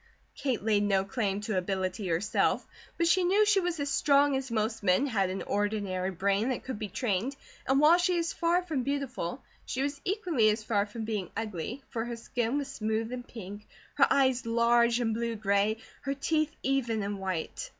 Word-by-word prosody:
Kate 255 -7 -2
laid 210 -2 +3
no 195 -2 +2
claim 205 -3 -1
to 210 0 -2
"ability," 185 +1 -2
herself; 170 +4 +1 0.3
but 340 - +2
she 355 +2 +4
knew 395 +4 +4
she 410 -1 +4
was 350 -3 -2
as 285 0 -1
strong 280 -1 +4
as 265 0 -3
most 220 0 -1
men, 185 +6 +3
had 200 -8 +1
an 190 +1 -3
ordinary 205 -3 -1
brain 195 +5 0
that 255 - -2
could 255 -5 -5
be 215 - -3
trained, 220 +5 -1 0.3
and 265 +1 +3
while 315 +4 +6
she 360 0 +2
was 335 -1 -1
far 345 +1 +1
from 315 -7 -2
beautiful 265 -5 -3 0.2
she 260 - -2
was 285 0 -3
equally 355 - +2
as 215 +1 -1
far 205 -2 +1
from 220 +2 -6
being 210 -5 -3
ugly, 225 - -4
for 225 -2 -2
her 240 0 -4
skin 235 +2 -2
was 285 -2 -2
smooth 220 -3 -2
and 245 -1 -6
pink, 205 -2 -9 0.3
her - - +5
eyes 260 -3 +2
large 235 +1 +3
and 225 -2 0
blue 230 0 -2
gray, 205 +1 +1 0.2
her 275 0 -2
teeth 310 +2 0
even 240 -5 0
and 200 0 -3
white. 185 -4 -4
230 Hz, 195 wpm, -29 LUFS, 205-275 Hz, 0.3 s, while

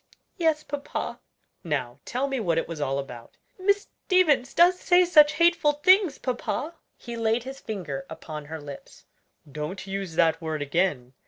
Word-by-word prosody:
"Yes, 320 -4 +1
papa." 290 -1 -5 0.4
"Now 140 -8 -3
tell 255 +3 -1
me 270 -2 -2
what 170 -7 0
it - - 0
was 165 -3 -6
all 135 -1 0
about." 125 -4 -8 0.2
"Miss 400 +2 +1 0.2
Stevens 310 -9 +3
does 355 +2 +5
say 360 0 +4
such 300 -4 +6
hateful 335 -3 +3
things, 360 0 +4
papa!" 270 +5 -3 0.2
He 235 -1 -8
laid 225 0 0
his 270 +1 -8
finger 220 +6 -5
upon 155 -2 -8
her 160 +2 -7
lips. 145 -2 -11 0.5
"Don't 150 +7 -5
use 195 -3 -5
that 165 0 +3
word 155 -2 -3
again. 145 -5 -1
230 Hz, 160 wpm, -26 LUFS, -, 0.5 s, such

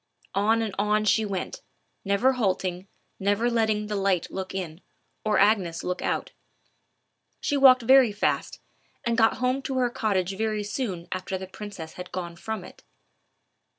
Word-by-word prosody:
On 220 +3 +2
and 215 -3 -3
on 210 +1 +2
she 215 +2 +3
went, 200 - -4 0.4
never 200 +6 +3
halting, 190 -5 -1 0.3
never 205 +5 +1
letting 220 -2 +1
the 210 0 -3
light 195 -3 0
look 190 0 -5
in, 175 -2 -5 0.4
or 215 -1 +2
Agnes 190 -6 +2
look 180 0 -2
out. - - -2 1.1
She 290 - -1
walked 260 -3 +7
very 260 -1 +6
fast, 205 - -1 0.5
and 235 -1 +1
got 225 -1 +4
home 255 +2 0
to 265 -1 -3
her 245 -2 +2
cottage 195 -5 0
very 215 0 -1
soon 205 -6 -4
after 185 +1 -3
the 190 - -6
princess 190 -4 -8
had 180 - -10
gone 175 -2 -5
from 215 +2 -5
it. - - -13
210 Hz, 155 wpm, -26 LUFS, 190-225 Hz, 1.1 s, walked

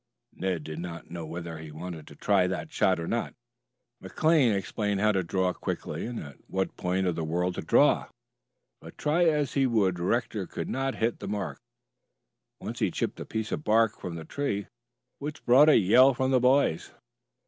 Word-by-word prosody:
Ned 90 -4 -2
did 80 +1 -6
not 85 -1 -7
know 85 -2 -6
whether 85 0 -6
he 80 -1 -9
wanted 80 0 -8
to - - -12
try 95 -3 +2
that 90 -4 -4
shot 95 -2 +2
or 85 - -3
not. 115 - -2 0.7
McKay 155 -7 +3
explained 105 +1 -2
how 105 +1 +3
to 95 -2 +1
draw 90 +1 0
quickly - - -4
and 120 -1 -5
at 70 -3 -9
what 95 0 -2
point 90 +1 -1
of 90 -2 0
the 80 - -3
whirl 90 +3 0
to - - -4
draw, - - +3 0.7
but - - -13
try 160 +4 +2
as 150 -4 +1
he 135 -2 +3
would 100 -7 +1
Rector 105 +1 -1
could - - -5
not 135 0 -1
hit 115 +1 -1
the - - -6
mark. 105 -1 -4 1.0
Once - - -6
he - - +2
chipped - - -3
a - - -5
piece 110 0 -4
of 155 - -3
bark 110 -1 +2
from 85 -2 -5
the 80 -1 -7
tree, 105 - -2 0.5
which 150 +2 -6
brought 135 +6 +7
a - - +7
yell 125 +7 +6
from 130 +1 0
the 130 - +4
boys. 125 - +2
100 Hz, 190 wpm, -28 LUFS, 85-125 Hz, 1.0 s, brought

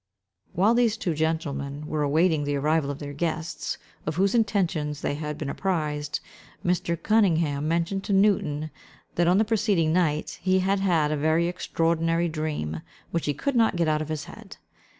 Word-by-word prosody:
While 200 +6 +4
these 235 -2 +2
two 175 -6 -1
gentlemen 150 -2 -2
were 150 0 -2
awaiting 155 +2 +2
the 145 0 -1
arrival 150 +1 +1
of 140 - -3
their 145 -1 -7
guests, 160 +2 -3 0.3
of 155 - -1
whose 195 +3 +2
intentions 175 -10 0
they - - -1
had 150 0 -4
been 150 - -4
apprised, 150 -3 -2 0.4
Mr. 175 -1 0
Cunningham 165 -9 +2
mentioned 170 +4 0
to 200 - 0
Newton, 155 -7 +2 0.4
that 175 0 +2
on 180 +2 +4
the 220 - +3
preceding 205 -7 +2
night, 155 -4 0
he 185 0 +3
had 195 +1 +1
had 165 -6 +2
a - - +1
very 160 +3 +2
extraordinary 165 -1 0
dream, 150 - -3 0.3
which 170 -2 -1
he 145 - 0
could 280 - -2
not 225 -5 +3
get 170 -2 +1
out 155 0 +1
of 155 - -5
his 155 -2 -3
head. - - -12
165 Hz, 175 wpm, -26 LUFS, 150-185 Hz, 0.4 s, While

